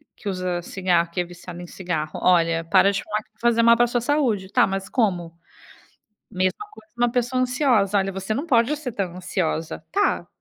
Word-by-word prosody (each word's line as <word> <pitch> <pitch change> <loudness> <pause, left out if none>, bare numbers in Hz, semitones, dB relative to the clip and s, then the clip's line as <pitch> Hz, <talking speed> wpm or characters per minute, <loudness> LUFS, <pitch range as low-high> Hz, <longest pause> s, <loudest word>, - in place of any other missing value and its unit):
que 215 - -10
usa 185 -2 -2
cigarro, 175 -2 0
que 180 - -1
é - - -1
viciado 175 0 -10
em 175 - -8
cigarro. 160 -5 -4
Olha, 165 -2 +3
para 180 +4 +4
de 200 - -3
fumar 210 0 -2
que - - -37
vai 215 - -38
fazer 230 0 +2
mal 235 0 +7
para 240 - +3
a - - -3
sua 240 0 -1
saúde. 240 -8 0
Tá, - - +4
mas 195 0 -4
como? 175 -8 -1 0.9
Mesma 185 - -1
coisa, 330 -5 -17
uma 240 0 +2
pessoa 250 +1 0
ansiosa. 250 -6 +2
Olha, 195 -1 +1
você 190 +3 -3
não 275 +7 -2
pode 255 0 +3
ser 285 -4 -5
tão 190 -5 -4
ansiosa, 165 -3 -3
tá, 410 +1 +1
195 Hz, 210 wpm, -23 LUFS, 175-240 Hz, 0.9 s, mal